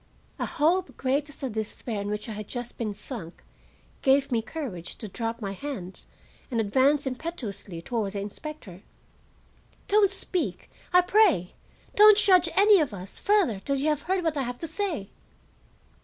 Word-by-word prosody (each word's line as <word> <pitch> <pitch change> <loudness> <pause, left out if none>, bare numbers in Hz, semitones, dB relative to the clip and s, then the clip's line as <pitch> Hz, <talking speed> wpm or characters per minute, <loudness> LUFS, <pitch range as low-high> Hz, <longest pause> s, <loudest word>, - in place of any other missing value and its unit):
A - - -1
hope, 345 +3 +1
great 275 +3 0
as 290 - -12
the 270 - -3
despair 220 0 -4
in 200 - -4
which 210 +2 -3
I - - -5
had 210 -1 -6
just 245 -1 -6
been 220 -3 -1
sunk, 195 -6 -8 0.6
gave 270 +1 +3
me 230 -2 +2
courage 225 - -6
to 215 - -7
drop 230 +3 -4
my 195 - -2
hands 195 -4 -7 0.4
and 240 -4 -1
advance 265 +7 +3
impetuously 230 - -5
toward 215 -3 -2
the 200 - -3
inspector. 205 - -8 1.1
"Don't 410 -1 +5
speak, 370 -2 -3 0.2
I 360 0 +7
pray; 360 - +3 0.4
don't 425 0 +8
judge 365 -5 +5
any 405 0 +7
of 285 -10 -1
us 185 0 -9
further 390 - +2
till 275 +8 -1
you 280 +3 +1
have 300 -2 0
heard 370 +2 -1
what 320 -2 0
I - - +1
have 245 -1 -4
to 330 - -3
say." 325 - -3
265 Hz, 170 wpm, -27 LUFS, 210-335 Hz, 1.1 s, don't